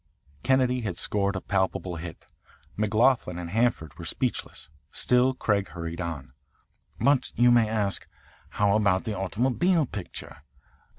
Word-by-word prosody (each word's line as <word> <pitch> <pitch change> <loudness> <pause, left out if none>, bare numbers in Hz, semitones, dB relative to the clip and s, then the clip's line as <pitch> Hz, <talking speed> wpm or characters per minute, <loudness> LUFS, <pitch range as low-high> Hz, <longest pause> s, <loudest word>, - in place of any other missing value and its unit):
Kennedy 130 -1 +2
had 100 -7 -4
scored 100 +1 0
a 95 - -3
palpable 95 -2 -1
hit. 85 0 -8 0.5
McLaughlin 110 -2 +2
and 85 -1 -6
Hanford 110 - 0
were - - -6
speechless. - - -3 0.2
Still 125 +1 +3
Craig 100 -5 0
hurried 85 0 -6
on. 75 -6 -5 0.7
"But, 140 -2 +2
you 120 +1 +5
may 115 -2 +4
ask, 105 -3 -1 0.4
how 100 -1 +2
about 100 -3 +2
the 110 - -3
automobile 130 - +1
picture? 100 -7 -7
105 Hz, 130 wpm, -27 LUFS, 90-120 Hz, 0.7 s, you